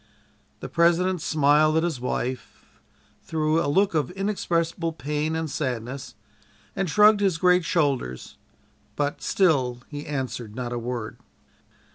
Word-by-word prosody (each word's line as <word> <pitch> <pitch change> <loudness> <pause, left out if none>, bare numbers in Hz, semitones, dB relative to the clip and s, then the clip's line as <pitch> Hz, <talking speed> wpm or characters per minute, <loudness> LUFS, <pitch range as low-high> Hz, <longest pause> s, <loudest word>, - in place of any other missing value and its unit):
The - - -5
President 175 +1 +2
smiled 155 +1 +3
at 160 - +2
his 160 -8 -2
wife, 125 0 -4 0.6
through 160 +1 0
a - - -1
look 195 +6 +2
of 155 0 0
inexpressible 170 -4 -1
pain 150 +2 -2
and 160 0 -2
sadness, 130 -2 -4 0.6
and 195 -3 -1
shrugged 210 +4 +6
his 195 -5 +1
great 180 +1 +4
shoulders, 140 - -1 0.6
but 145 0 -2
"still 130 -10 +1
he 145 -1 -7
answered 125 -6 -4
not 120 -1 -4
a 120 - -2
word." 120 -2 -5
155 Hz, 130 wpm, -25 LUFS, 130-170 Hz, 0.6 s, shrugged